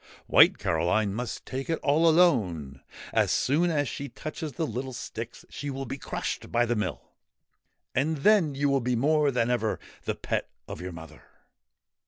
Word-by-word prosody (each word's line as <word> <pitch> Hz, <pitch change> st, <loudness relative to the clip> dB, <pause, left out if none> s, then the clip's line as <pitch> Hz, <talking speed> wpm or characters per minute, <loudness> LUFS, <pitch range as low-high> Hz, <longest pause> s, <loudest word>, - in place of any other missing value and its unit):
White -, -, +6 dB
Caroline 90 Hz, +5 st, +1 dB
must 120 Hz, +2 st, -4 dB
take 135 Hz, +3 st, -5 dB
it 165 Hz, -, +1 dB
all 155 Hz, +4 st, +4 dB
alone. 95 Hz, -, +2 dB, 0.3 s
As -, -, +3 dB
soon 160 Hz, +6 st, +2 dB
as 145 Hz, -4 st, +1 dB
she 140 Hz, +4 st, -5 dB
touches 155 Hz, -1 st, -6 dB
the 165 Hz, -, -1 dB
little 130 Hz, 0 st, -4 dB
sticks -, -, -7 dB
she 145 Hz, -, -6 dB
will 135 Hz, 0 st, -4 dB
be 135 Hz, +3 st, -6 dB
crushed -, -, -4 dB
by 120 Hz, +1 st, +3 dB
the 120 Hz, 0 st, 0 dB
mill, 105 Hz, -, -2 dB, 0.9 s
and 150 Hz, +5 st, +1 dB
then 165 Hz, -2 st, +4 dB
you 145 Hz, +1 st, +1 dB
will 140 Hz, -1 st, +2 dB
be 125 Hz, +1 st, 0 dB
more 150 Hz, +4 st, +3 dB
than 120 Hz, -2 st, +1 dB
ever 110 Hz, -3 st, 0 dB, 0.3 s
the -, -, -1 dB
pet -, -, -2 dB, 0.2 s
of -, -, -7 dB
your 90 Hz, +1 st, -5 dB
mother 80 Hz, -2 st, -11 dB
135 Hz, 175 wpm, -27 LUFS, 115-150 Hz, 0.9 s, White